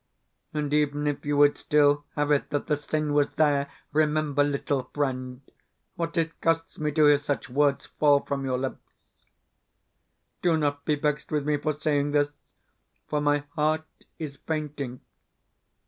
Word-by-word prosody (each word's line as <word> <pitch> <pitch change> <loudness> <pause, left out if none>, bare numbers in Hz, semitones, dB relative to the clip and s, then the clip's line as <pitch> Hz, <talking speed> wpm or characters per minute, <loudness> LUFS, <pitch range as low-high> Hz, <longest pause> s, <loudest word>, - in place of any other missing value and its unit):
And 150 -1 -2
even 150 0 +1
if 145 0 -2
you 145 0 +1
would 145 0 +5
still 145 -1 +3
have 145 -1 0
it 145 - +2
that 145 - -1
the 150 - +1
sin 150 0 -2
was 145 -1 +2
there, 145 -2 +2 0.2
remember, 150 -1 +2
little 140 -2 -1
friend, 130 -3 -2 0.5
what 170 +1 -3
it 165 0 -1
costs 165 0 0
me 150 -1 0
to 155 0 +4
hear 145 -1 +6
such 145 -3 -3
words 140 +1 +2
fall 145 -2 +6
from 140 -1 -3
your 130 -1 0
lips. 130 +1 -4 1.6
Do 170 -2 +3
not 145 -2 -1
be 150 - +2
vexed 150 0 -2
with 150 -2 0
me 150 0 +2
for 155 +1 -1
saying 145 -1 0
this, 145 0 +2 0.8
for 150 -1 -1
my 145 0 +2
heart 155 0 +1 0.3
is 145 -3 -6
fainting. 145 -5 -4
145 Hz, 160 wpm, -26 LUFS, 145-150 Hz, 1.6 s, hear